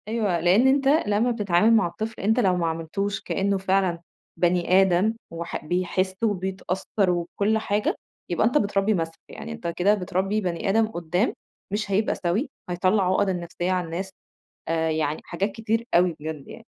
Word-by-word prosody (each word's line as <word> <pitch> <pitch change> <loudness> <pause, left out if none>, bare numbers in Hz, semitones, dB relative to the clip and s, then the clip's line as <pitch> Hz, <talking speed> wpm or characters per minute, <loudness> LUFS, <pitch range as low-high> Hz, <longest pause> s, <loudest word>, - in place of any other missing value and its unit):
أيوه. 215 -6 0
لإن 185 +9 +4
أنت 270 0 +3
لمّا 245 -5 +3
بتتعامل 210 -1 +3
مع 220 -6 +4
الطفل 215 +6 -6
أنت 220 +5 +2
لو 190 -6 +3
ما 170 -2 0
عاملتوش 165 +5 -3
كإنّه 195 0 0
فعلًا 190 -3 +1 0.4
بني 180 +2 +3
آدم 190 +3 +3 0.2
وح 165 -1 -5
بيحِس 185 +2 0
وبيتأثّر 190 -1 -1
وكل 180 +5 0
حاجة، 210 -1 0 0.3
يبقى 175 +5 +2
أنت 250 - +2
بتربّي 200 -2 +1
مَسْخ، 165 -3 -2 0.2
يعني 75 - -8
أنت 75 - -6
كده 180 +4 +2
بتربّي 195 +1 -1
بني 180 0 -2
آدم 220 +2 +3
قُدّام، 175 +1 -1 0.4
مش 205 -1 -2
هيبقى 210 +3 +1
سَوِي، 195 - -1 0.2
هيطلّع 185 +3 +2
عُقَده 190 +1 +2
النفسيّة 175 0 -3
على 180 -1 0
الناس، 180 +4 -5 0.6
آآ 160 0 0
يعني 155 -1 -1
حاجات 195 +4 -2
كتير 225 +2 -1
أوي 175 -1 +4
بجد 155 -2 -6
يعني. - - -11
190 Hz, 165 wpm, -25 LUFS, 175-210 Hz, 0.6 s, لإن